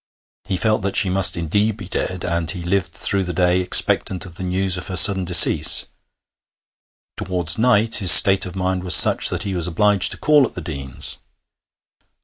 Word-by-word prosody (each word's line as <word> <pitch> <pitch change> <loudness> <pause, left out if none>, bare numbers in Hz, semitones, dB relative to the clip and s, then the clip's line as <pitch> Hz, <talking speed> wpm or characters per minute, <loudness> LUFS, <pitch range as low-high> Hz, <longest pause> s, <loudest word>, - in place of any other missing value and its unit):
He 95 -1 -6
felt 110 +2 -3
that 100 0 -7
she 95 -3 +2
must 95 -1 +2
indeed 105 +6 -4
be 100 -5 -12
dead, 90 -1 -7
and 85 -2 -5
he 90 -1 -6
lived 90 -1 -5
through 100 +3 -2
the 90 -2 -8
day 90 0 -2
expectant 90 0 +1
of 90 - -15
the 90 - -14
news 95 +1 -1
of 90 - -6
her 95 - -8
sudden 95 +2 +4
decease. 90 0 +3 1.3
Towards 90 -1 -4
night 115 -2 0
his 95 -5 +5
state 95 -1 +6
of 90 - -12
mind 95 -1 -6
was 90 -1 +4
such - - +4
that - - -6
he 100 - -7
was 90 -2 -5
obliged 100 +3 -1
to - - -12
call 150 -4 0
at - - -19
the - - -9
Deanes'. 70 -6 -8
95 Hz, 190 wpm, -16 LUFS, 90-100 Hz, 1.3 s, state